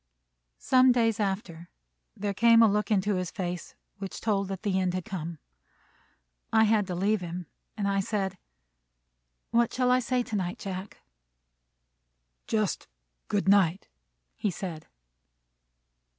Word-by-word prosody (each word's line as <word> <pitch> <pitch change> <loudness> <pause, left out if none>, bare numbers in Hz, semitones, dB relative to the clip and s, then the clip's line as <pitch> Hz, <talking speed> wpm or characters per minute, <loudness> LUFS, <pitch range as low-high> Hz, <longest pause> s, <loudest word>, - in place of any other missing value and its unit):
Some 255 0 +5
days 225 -3 +2
after, 190 -4 -3 0.5
there 200 0 -2
came 230 +2 +6
a - - +7
look 210 +1 0
into 205 -1 +2
his 180 -1 -2
face 180 -2 -5 0.2
which 195 -1 -6
told 200 -3 0
that 195 0 -6
the 195 -3 +1
end 185 -1 0
had 185 -3 -3
come. 170 -3 -5 1.1
I 220 0 +5
had 215 -2 +3
to 180 - -3
leave 200 +3 +1
him, 175 0 -5 0.3
and 205 -2 0
I 195 0 +1
said, 195 -2 -2 1.1
"What 235 0 +3
shall 250 0 +1
I 250 - +5
say 250 0 0
tonight, 190 -6 -3
Jack?" 190 0 -7 1.4
"Just 215 -3 -1 0.4
good 200 -2 0
night," 195 -2 +3 0.5
he 210 - -1
said. 175 -4 -6
200 Hz, 135 wpm, -28 LUFS, 185-220 Hz, 1.4 s, a